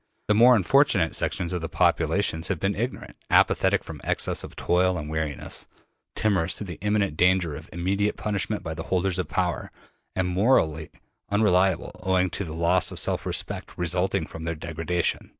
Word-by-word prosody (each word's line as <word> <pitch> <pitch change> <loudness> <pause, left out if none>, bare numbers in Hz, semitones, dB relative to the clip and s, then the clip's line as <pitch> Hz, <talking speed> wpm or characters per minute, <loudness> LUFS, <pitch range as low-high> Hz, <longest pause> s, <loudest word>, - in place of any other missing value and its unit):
The 105 - +4
more 120 +4 +7
unfortunate 105 - +3
sections 90 0 -1
of 90 - -2
the 80 - -4
population 80 - +1
have 95 -5 -1
been 95 +1 0
ignorant, 120 +5 -5
apathetic - - +3
from - - -9
excess - - 0
of - - -10
toil 90 +1 +1
and 75 -2 -5
weariness, 80 -3 -4 0.5
timorous 95 -5 +1
through 105 - -5
the 90 -4 -8
imminent 105 -5 0
danger 90 -3 +2
of 80 +2 -10
immediate 100 +4 -1
punishment 105 0 -2
by 80 - -4
the - - -6
holders 95 0 +1
of 90 - -3
power, - - -2 0.4
and 95 -1 0
morally 90 - +2 0.4
unreliable 95 -3 +2
owing 95 -1 +1
to 100 - -3
the 80 -3 -6
loss 85 +2 +2
of - - -7
self - - -1
respect - - -3
resulting 90 +1 0
from 80 0 -9
their 85 0 -2
degradation. 85 +2 -2
90 Hz, 170 wpm, -25 LUFS, 80-100 Hz, 0.5 s, more